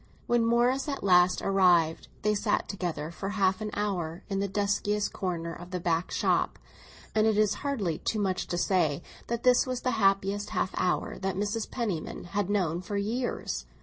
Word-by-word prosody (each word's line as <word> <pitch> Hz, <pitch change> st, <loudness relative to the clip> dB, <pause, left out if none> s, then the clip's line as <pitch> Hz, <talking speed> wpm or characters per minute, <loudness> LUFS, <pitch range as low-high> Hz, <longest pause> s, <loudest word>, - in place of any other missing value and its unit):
When 240 Hz, -1 st, +2 dB
Morris 245 Hz, +5 st, +2 dB
at 280 Hz, -, -4 dB
last 180 Hz, -1 st, +4 dB
arrived, 175 Hz, -5 st, +3 dB, 0.2 s
they 210 Hz, 0 st, +3 dB
sat 205 Hz, 0 st, 0 dB
together 175 Hz, -5 st, -3 dB
for 180 Hz, +4 st, -5 dB
half 195 Hz, 0 st, +1 dB
an 215 Hz, -, -2 dB
hour 180 Hz, -5 st, -2 dB
in 195 Hz, -1 st, -1 dB
the 200 Hz, -, 0 dB
duskiest 205 Hz, +1 st, 0 dB
corner 170 Hz, -3 st, -3 dB
of 175 Hz, +1 st, -10 dB
a -, -, -1 dB
back 170 Hz, 0 st, 0 dB
shop; -, -, +1 dB, 0.6 s
and 215 Hz, 0 st, +3 dB
it 215 Hz, -1 st, +2 dB
is 215 Hz, -1 st, +3 dB
hardly 215 Hz, -, -1 dB
too 220 Hz, -, -1 dB
much 190 Hz, -3 st, -1 dB
to 175 Hz, -, -2 dB
say 170 Hz, -5 st, +1 dB, 0.2 s
that 235 Hz, 0 st, -3 dB
this 250 Hz, +1 st, +5 dB
was 255 Hz, -1 st, -2 dB
the 255 Hz, -, 0 dB
happiest 195 Hz, +1 st, +2 dB
half -, -, +1 dB
hour 180 Hz, -1 st, -1 dB
that 190 Hz, -1 st, -2 dB
Mrs. 210 Hz, +3 st, -2 dB
Penniman 205 Hz, -10 st, -3 dB
had 205 Hz, 0 st, -1 dB
known 180 Hz, -5 st, 0 dB
for 205 Hz, +2 st, -4 dB
years. 215 Hz, -, -2 dB
195 Hz, 180 wpm, -28 LUFS, 180-215 Hz, 0.6 s, this